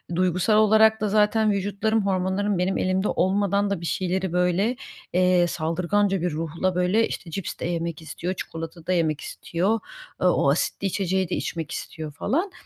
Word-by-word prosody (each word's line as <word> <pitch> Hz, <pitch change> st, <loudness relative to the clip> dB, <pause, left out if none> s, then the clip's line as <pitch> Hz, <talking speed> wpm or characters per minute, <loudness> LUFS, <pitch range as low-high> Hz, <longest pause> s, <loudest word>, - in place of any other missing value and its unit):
duygusal 185 Hz, +4 st, +2 dB
olarak 220 Hz, 0 st, +5 dB
da 210 Hz, -, +1 dB
zaten 215 Hz, +1 st, +3 dB
vücutlarım 205 Hz, +2 st, 0 dB
hormonlarım 190 Hz, +1 st, 0 dB
benim 185 Hz, +2 st, 0 dB
elimde 185 Hz, +2 st, 0 dB
olmadan 200 Hz, +1 st, +1 dB
da 195 Hz, -4 st, -2 dB
bir -, -, -5 dB
şeyleri 185 Hz, 0 st, -1 dB
böyle, 180 Hz, +6 st, +1 dB, 0.4 s
eee, 180 Hz, -1 st, +4 dB
saldırganca 180 Hz, +4 st, 0 dB
bir 180 Hz, -2 st, 0 dB
ruhla 165 Hz, +4 st, -2 dB
böyle 180 Hz, +5 st, +2 dB
işte 170 Hz, -3 st, -7 dB
cips 195 Hz, +1 st, -5 dB
de -, -, -3 dB
yemek 170 Hz, -2 st, -3 dB
istiyor, 175 Hz, +3 st, -4 dB
çikolata 165 Hz, 0 st, -7 dB
da 185 Hz, -, +2 dB
yemek 155 Hz, -4 st, 0 dB
istiyor, 195 Hz, +7 st, -1 dB, 0.4 s
aaa, 180 Hz, -, +4 dB
o 140 Hz, -, +3 dB
asitli 175 Hz, +5 st, -1 dB
içeceği 190 Hz, -1 st, -1 dB
de -, -, -1 dB
içmek 165 Hz, -3 st, -4 dB
istiyor 155 Hz, -2 st, -6 dB
falan. 330 Hz, -, -1 dB
185 Hz, 165 wpm, -24 LUFS, 170-205 Hz, 0.4 s, olarak